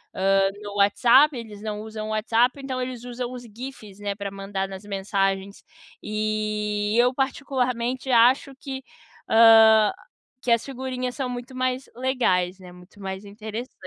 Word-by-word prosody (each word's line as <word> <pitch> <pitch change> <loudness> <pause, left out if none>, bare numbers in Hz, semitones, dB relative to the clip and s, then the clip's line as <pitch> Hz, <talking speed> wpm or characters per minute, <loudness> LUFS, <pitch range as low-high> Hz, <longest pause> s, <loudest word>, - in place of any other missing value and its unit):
hã, 195 0 +3
no 205 0 -7
WhatsApp. 250 +8 +5
Eles 215 -3 -9
não 210 -1 -4
usam 215 0 -6
o - - -6
WhatsApp, 230 +5 +2
então 260 -1 -3
eles 250 -1 -5
usam 245 0 -5
os 250 -1 -8
GIFs, 225 -3 -10
né, 205 -1 -3
pra 200 -1 -5
mandar 195 -1 -4
nas 190 +1 -8
mensagens 195 0 -2 0.4
e 215 0 -1
eu 250 +1 +4
particularmente 260 -2 -1
acho 255 +3 +4
que, 265 0 -7 0.5
hã, 220 -1 +7 0.5
que 245 - -1
as 235 -1 +3
figurinhas 255 -2 -4
são 265 -3 -2
muito 245 +1 -7
mais 255 +1 -2
legais, 195 -8 0
né, 180 -1 -12
muito 180 +3 -17
mais 190 +1 -6
interessan 220 +4 -7
220 Hz, 150 wpm, -24 LUFS, 205-255 Hz, 0.5 s, hã